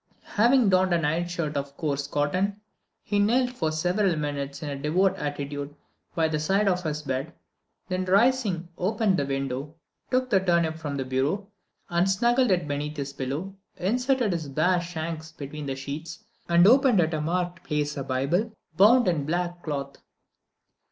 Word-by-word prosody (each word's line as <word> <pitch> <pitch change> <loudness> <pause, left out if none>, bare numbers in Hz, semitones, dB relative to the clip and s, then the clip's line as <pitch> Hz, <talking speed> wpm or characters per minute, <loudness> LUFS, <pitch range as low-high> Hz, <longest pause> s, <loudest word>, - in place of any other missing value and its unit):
Having 235 +1 +4
donned 185 -1 +3
a - - +4
nightshirt 165 0 -1
of 140 0 -4
coarse 140 -3 -2
cotton, 185 +9 0 0.4
he 205 - 0
knelt 245 +5 +3
for 160 -11 -1
several 180 +4 +1
minutes 140 -1 -4
in 150 - -3
a - - -3
devout 180 +7 +1
attitude 145 -1 -4 0.4
by 160 -1 +2
the 155 -1 -1
side 195 +7 +1
of 180 -1 +2
his 155 -3 -3
bed, 135 +3 -3 0.6
then 185 0 -2
rising 200 -3 +2
opened 205 +1 +1
the 140 - -1
window, 135 +2 -3 0.3
took 255 0 0
the 195 - +5
turnip 170 -3 +1
from 145 -3 -4
the 135 - -2
bureau, 140 +10 -1 0.4
and 175 +2 +1
snuggled 240 +5 +3
it 175 -5 +1
beneath 150 +1 -3
his 140 -1 -4
pillow, 140 +9 -4 0.2
inserted 245 +3 +1
his 160 -4 -4
bare 175 +6 +2
shanks 160 -2 -5
between 150 -1 -7
the 135 - -2
sheets, 145 +5 -7 0.3
and 170 +1 +6
opened 250 -1 +6
at 160 -1 +2
a 155 - -1
marked 175 +2 -2
place 150 -1 -1
a 140 - -3
Bible 140 - 0 0.2
bound 225 +7 +6
in 165 -5 +1
black 175 +1 -2
cloth. 140 -3 -4
165 Hz, 165 wpm, -26 LUFS, 145-190 Hz, 0.6 s, and